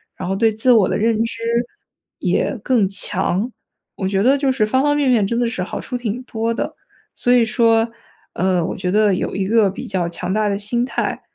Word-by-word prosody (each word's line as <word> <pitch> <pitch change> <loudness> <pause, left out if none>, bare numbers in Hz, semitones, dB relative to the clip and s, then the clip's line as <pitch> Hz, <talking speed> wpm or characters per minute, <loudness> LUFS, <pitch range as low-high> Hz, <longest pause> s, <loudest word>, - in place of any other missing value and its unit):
然 - - -5
后 195 - 0
对 220 +2 +2
自 220 +4 +2
我 220 -6 +5
的 - - -1
认 225 +1 +1
知 230 0 -5 0.8
也 - - 0
更 235 -8 +2
强。 195 +3 -1 0.4
我 190 - -2
觉 195 0 0
得 270 +4 +4
就 275 -1 +1
是 255 -5 +1
方 260 +5 +2
方 290 0 +2
面 290 -2 +2
面 230 -5 +3
真 235 +4 -1
的 240 - +1
是 190 -6 -3
好 185 - -5
处 250 - -4
挺 240 0 -3
多 230 -2 -2
的。 - - -4 0.4
所 245 - +2
以 245 -1 +5
说， 225 0 +2 0.4
呃， 185 -1 +1
我 - - -4
觉 180 -2 -2
得 210 -1 +3
有 - - -3
一 195 -1 -1
个 220 -1 +4
比 195 - -7
较 185 -3 -1
强 175 +1 -4
大 215 0 +1
的 200 -1 0
心 235 +4 -1
态 265 - -3
220 Hz, 240 characters per minute, -19 LUFS, 195-245 Hz, 0.8 s, 我